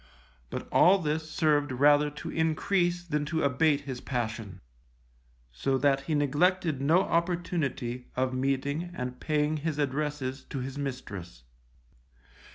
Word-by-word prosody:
But - - -5
all 190 +3 +6
this 155 -2 -2
served 150 -3 +2
rather 145 +3 +4
to 150 - -7
increase 175 +2 +1
than 150 -4 -1
to 160 +1 -1
abate 145 +2 +3
his 130 -3 -6
passion, 110 -6 -4 0.9
so 135 - 0
that 135 0 +2
he 155 - +2
neglected 150 +1 +1
no 160 +6 +4
opportunity 170 -9 -1
of 130 0 0
meeting 140 +5 -1
and 125 0 -5
paying 150 0 0
his 150 0 -3
addresses 140 -2 -2
to - - -6
his 130 +1 -4
mistress. 100 - -6
145 Hz, 130 wpm, -29 LUFS, 130-160 Hz, 0.9 s, all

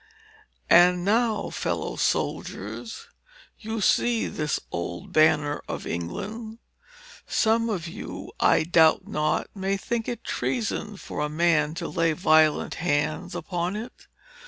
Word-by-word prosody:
"And 175 +1 +6
now, 225 +1 +1
fellow - - -2
soldiers, 250 - -3 0.5
you 220 0 -4
see 235 +3 +2
this 150 -3 -2
old 85 0 -5
banner 150 -1 +3
of - - -5
England. 215 - -5 0.7
Some 230 +1 +2
of 180 -6 -2
you, 165 - -7
I - - +4
doubt 160 -1 +4
not, 150 0 -1
may 195 0 -1
think 230 +3 -3
it 240 - -4
treason 215 -3 -2
for 165 - -7
a 150 0 0
man 155 -1 +2
to - - -4
lay 165 -1 +1
violent 155 -3 +3
hands 155 0 -1
upon 175 +2 -2
it. 225 +4 -8
175 Hz, 125 wpm, -25 LUFS, 155-220 Hz, 0.7 s, And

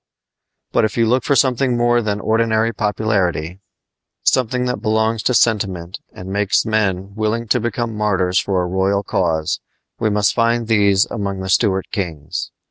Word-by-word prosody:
But - - +2
if 110 - -1
you 115 - +3
look 125 +2 +2
for 140 - +1
something 130 -1 +2
more 120 0 +3
than 105 -2 -2
ordinary 110 +1 +1
popularity 100 -5 -1 0.6
something 125 0 +1
that 125 -5 -2
belongs 110 0 +1
to 125 - +1
sentiment 95 -7 0
and 95 +1 -8
makes 100 +1 +1
men 100 -3 -1
willing 110 +2 -2
to 125 - +3
become 120 0 -2
martyrs 95 -4 +1
for 95 -2 0
a - - -2
royal 95 +2 0
cause 80 -5 -1 0.4
we 110 - +1
must 105 -1 +2
find 115 0 +1
these 100 -3 +3
among 100 -3 -3
the 95 - -5
Stuart 95 -1 +1
kings. 80 -7 -4
105 Hz, 160 wpm, -19 LUFS, 95-115 Hz, 0.6 s, you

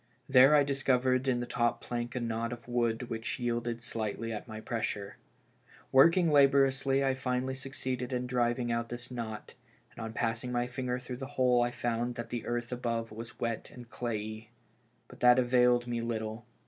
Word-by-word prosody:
There 135 +2 +7
I 145 - +6
discovered 130 -2 +1
in 125 -2 +2
the - - -2
top 120 -1 0
plank 120 0 -4
a - - 0
knot 115 0 -2
in 120 - -4
the 120 - -11
wood 120 -1 +1
which 115 0 -3
yielded 120 -1 -2
slightly 115 0 -3
at 105 - -6
my 110 -1 -7
pressure. 110 -3 -3 0.7
Working 165 +5 +6
laboriously 135 -1 +4
I 135 - +2
finally 130 0 -1
succeeded 130 -2 -4
in 125 0 -1
driving 120 -1 0
out 115 0 -1
this 120 +1 -7
knot, 110 -3 -6 0.4
and 115 - -8
on 110 0 -5
passing 115 +2 -2
my 120 0 0
finger 125 0 -3
through 125 0 -7
the 135 +1 -6
hole 125 -2 +4
I 120 - +2
found 120 0 -2
that 120 -1 -6
the 120 -2 -4
earth 120 0 -2
above 115 -2 -2
was 115 +2 -9
wet 115 -2 -3
and 120 -1 -12
clayey. 110 -2 -4 0.6
But - - -14
that 125 0 +6
availed 125 -1 +4
me 120 -1 -2
little. 110 0 -4
120 Hz, 185 wpm, -31 LUFS, 115-125 Hz, 0.7 s, There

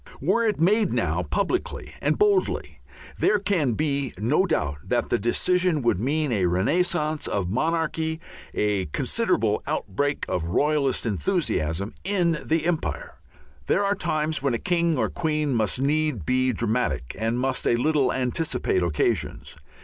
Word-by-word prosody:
Were 230 - +2
it 210 - 0
made 205 +6 +3
now - - 0
publicly - - -2
and - - +1
boldly, 410 -2 +1 0.4
there 210 - +3
can 185 - 0
be 140 0 -1
no 140 - +2
doubt 75 - -1
that - - 0
the - - +1
decision 170 - +1
would 120 -6 +2
mean 145 +4 0
a 95 -6 +2
renascence 150 - 0
of 100 -4 -1
monarchy, 160 +4 -1 0.3
a 105 -4 0
considerable 75 - 0
outbreak 145 +9 -1
of 90 -3 -2
royalist 140 - +1
enthusiasm 85 -1 -1
in 175 -5 +1
the 160 0 0
Empire. 170 -2 -2 0.5
There 200 - +2
are 200 - +2
times 155 -5 -1
when 135 -3 +1
a - - 0
king 170 +1 +1
or - - +1
queen 155 -4 -1
must 110 0 0
need 145 - 0
be 130 0 +2
dramatic 115 - -1
and 115 +2 0
must 130 0 0
a - - +4
little 140 +1 +2
anticipate 125 - 0
occasions. 85 -4 -1
145 Hz, 145 wpm, -25 LUFS, 115-165 Hz, 0.5 s, a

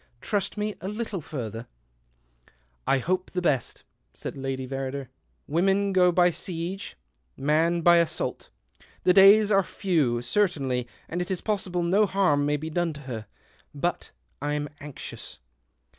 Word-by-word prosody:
Trust 205 - -2
me 210 0 -1
a 185 - -4
little 210 -3 -3
further." 115 -6 -6 0.6
" - - -35
I 135 - +4
hope 185 +7 -1
the 180 - -2
best," 145 -8 -1 0.5
Lady 135 -1 -4
Verrider 135 +1 -3
said. 125 - -17 0.3
" - - -45
Women 195 +3 +2
go 180 -1 +5
by 175 0 +4
siege, 175 - -5 0.4
man 160 +4 +2
by 170 +1 +6
assault. 170 -1 -1 0.5
The 180 - +5
days 200 +2 +7
are 195 -1 +5
few, 155 -12 0
certainly, 135 -7 0 0.2
and 175 +2 -3
it 180 - -4
is 190 -2 -2
possible 190 -5 -1
no 200 +5 +3
harm 150 -8 +2
may 150 0 +1
be 160 +2 -6
done 175 0 0
to 145 - -10
her. 115 -6 -6 0.5
But 175 +5 -2 0.3
I'm 145 0 -2
anxious." 145 -3 -8
170 Hz, 150 wpm, -26 LUFS, 135-190 Hz, 0.6 s, days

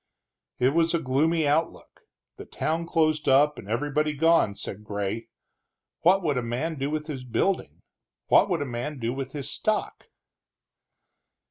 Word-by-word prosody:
It 125 - +3
was 165 +1 +2
a - - +1
gloomy 155 +3 +1
outlook, 155 +3 -1 0.4
the - - -9
town 165 +2 -2
closed 155 -3 +1
up 145 +3 +4
and 100 - -11
everybody 150 +5 0
gone, 160 -8 +3
said 105 +1 -7
Gray. 105 +2 -4 0.7
What 185 +3 +4
would 145 -6 +1
a - - -2
man 130 +7 -3
do 135 +1 -1
with 155 0 -3
his 140 -5 -6
building, 180 +10 -1 0.4
what - - +4
would 170 -5 0
a - - -5
man 130 +4 -4
do 120 -1 -2
with 135 0 -5
his 145 -3 -3
stock? 215 0 -2
150 Hz, 155 wpm, -26 LUFS, 125-165 Hz, 0.7 s, up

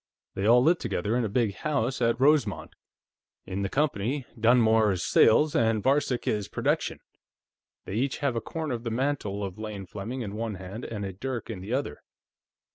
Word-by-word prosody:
They 95 +2 -1
all 120 +2 +6
live 170 +4 +4
together, 105 -1 -1
in 125 - +1
a 110 - -1
big 110 -1 +1
house 135 -4 -1
at 115 0 +2
Rosemont. 135 -7 +2 0.7
In 95 +1 -4
the 100 - -1
company, 135 -1 -1
Dunmore 110 -2 +4
is 90 - -3
Sales, 155 +1 +4
and 115 -5 +2
Varcek 135 -2 +1
is 105 -2 -1
Production. - - -1 0.8
They - - -6
each 130 +5 0
have 140 -5 -1
a 115 - -1
corner 155 +3 -4
of 115 -1 -4
the 115 - -2
mantle 115 -5 -1
of 95 +1 -6
Lane 105 -3 -6
Fleming 110 +8 -6
in 100 -4 -5
one 110 -1 -3
hand 95 +5 -7
and 105 -3 -4
a 95 - -5
dirk 120 +4 -5
in 100 - -6
the 105 +6 -5
other. 130 - -2
115 Hz, 190 wpm, -27 LUFS, 100-130 Hz, 0.8 s, all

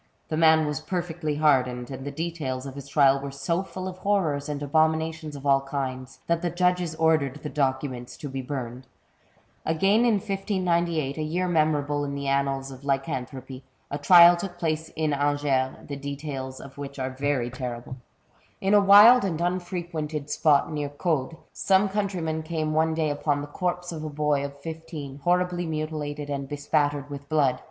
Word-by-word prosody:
The 155 - -1
man 160 -1 +5
was 150 +1 -2
perfectly 165 -2 -3
hardened, 130 -4 +2
and 130 0 -6
the 145 - -4
details 145 -4 -4
of 135 - -6
his 140 0 -9
trial 140 -1 +4
were 140 0 -5
so 140 +6 -1
full 185 -1 -6
of 185 0 -7
horrors 165 -9 0
and 145 -1 -3
abominations 160 +1 0
of 140 0 -9
all 135 -1 +4
kinds, 130 -2 -5
that 170 0 0
the 175 - 0
judges 180 -1 0
ordered 160 -4 +2
the 150 - -5
documents 130 -3 -2
to 145 - -6
be 135 -1 -4
burned. 125 -1 -6 0.8
Again 195 +7 +2
in 235 -3 +4
1598, 175 -7 -1
a - - -1
year 175 +4 -1
memorable 150 -3 +1
in 140 0 -3
the 140 0 -4
annals 135 0 0
of 130 +1 -11
lycanthropy, 135 -2 -3 0.3
a 145 - -3
trial 175 +3 +8
took 175 0 -6
place 160 -2 -2
in 155 -2 0
Angers, 145 -2 +1
the 140 - -5
details 140 -2 -5
of 140 +1 -12
which 140 0 -7
are 130 0 -2
very 130 -2 -1
terrible. 125 0 -6 0.6
In 195 +1 +1
a 205 - +7
wild 205 +5 +8
and 175 -5 -1
unfrequented 175 -4 -3
spot 150 -1 +3
near 145 -1 -2
Caude, 150 0 -2 0.2
some 195 +1 +3
countryman 190 -6 -2
came 155 -1 -2
one 160 +1 +2
day 155 -2 0
upon 145 0 0
the - - -4
corpse 180 +3 -3
of 160 -2 -6
a 155 - -4
boy 150 -1 0
of 140 0 -7
fifteen, 160 -3 -7
horribly 175 +2 +1
mutilated 155 -2 -4
and 140 -1 -4
bespattered 145 -1 0
with 140 0 -8
blood. 140 -5 +2
150 Hz, 175 wpm, -26 LUFS, 140-170 Hz, 0.8 s, trial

